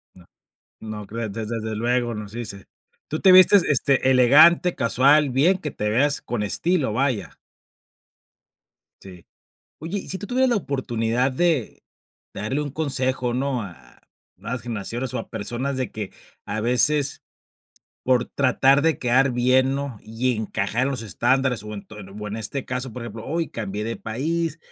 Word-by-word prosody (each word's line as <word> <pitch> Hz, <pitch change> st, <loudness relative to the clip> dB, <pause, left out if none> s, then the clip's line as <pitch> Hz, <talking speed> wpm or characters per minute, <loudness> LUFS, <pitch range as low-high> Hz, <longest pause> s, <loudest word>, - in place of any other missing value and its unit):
No, 90 Hz, -2 st, -17 dB, 0.7 s
no 105 Hz, -1 st, -6 dB
creo, 115 Hz, +2 st, -4 dB
des 105 Hz, +1 st, -5 dB
des 115 Hz, -2 st, -3 dB
desde 110 Hz, -1 st, -4 dB
luego 120 Hz, +1 st, 0 dB
nos 105 Hz, -1 st, -7 dB
dice. 110 Hz, -4 st, -7 dB, 0.4 s
¿Tú 155 Hz, -, -3 dB
te 190 Hz, -, +6 dB
vistes 185 Hz, +1 st, +7 dB
este 135 Hz, -1 st, +2 dB
elegante, 150 Hz, +8 st, +6 dB
casual, 140 Hz, +5 st, +3 dB
bien 155 Hz, +9 st, +3 dB
que 155 Hz, -5 st, -5 dB
te 105 Hz, -5 st, -3 dB
veas 140 Hz, +6 st, +2 dB
con 120 Hz, -3 st, -3 dB
estilo, 130 Hz, -, 0 dB
vaya? 110 Hz, -, -1 dB, 1.6 s
Sí. 90 Hz, -3 st, -13 dB, 0.5 s
Oye, 170 Hz, +6 st, -4 dB
y -, -, -10 dB
si 190 Hz, -, -3 dB
tú 205 Hz, -, -8 dB
tuvieras 260 Hz, +2 st, +2 dB
la 240 Hz, -, +2 dB
oportunidad 125 Hz, -, -1 dB
de 155 Hz, -3 st, -1 dB, 0.5 s
darle 130 Hz, +8 st, -2 dB
un 145 Hz, -, -4 dB
consejo, 130 Hz, -4 st, -1 dB
¿no? 130 Hz, -1 st, -1 dB
A 85 Hz, -11 st, -13 dB, 0.3 s
nuevas 120 Hz, 0 st, -5 dB
generaciones, 120 Hz, +2 st, -4 dB
o, -, -, -1 dB
a -, -, -8 dB
personas 125 Hz, +6 st, -3 dB
de 130 Hz, -2 st, -3 dB
que 105 Hz, -3 st, -6 dB, 0.3 s
a 105 Hz, +1 st, -3 dB
veces 135 Hz, +4 st, +1 dB, 0.8 s
por 125 Hz, -2 st, +2 dB
tratar 135 Hz, +1 st, +3 dB
de 160 Hz, -2 st, +2 dB
quedar 130 Hz, +2 st, +3 dB
bien, 130 Hz, +2 st, +2 dB
¿no? 140 Hz, -6 st, -4 dB
Y 115 Hz, +2 st, -1 dB
encajar 110 Hz, +2 st, -2 dB
en -, -, 0 dB
los 130 Hz, -4 st, -3 dB
estándares, 125 Hz, +3 st, 0 dB
o, 105 Hz, 0 st, -7 dB
ento 105 Hz, +1 st, -10 dB, 0.2 s
o, 105 Hz, -, -5 dB
en 105 Hz, -, -5 dB
este 120 Hz, +5 st, -4 dB
caso, 125 Hz, 0 st, -4 dB
por 125 Hz, -, -7 dB
ejemplo, 115 Hz, -1 st, -8 dB
hoy 165 Hz, +2 st, -2 dB
cambié 105 Hz, -2 st, -4 dB
de 115 Hz, +1 st, -3 dB
país 160 Hz, +8 st, -3 dB
125 Hz, 165 wpm, -23 LUFS, 110-140 Hz, 1.6 s, vistes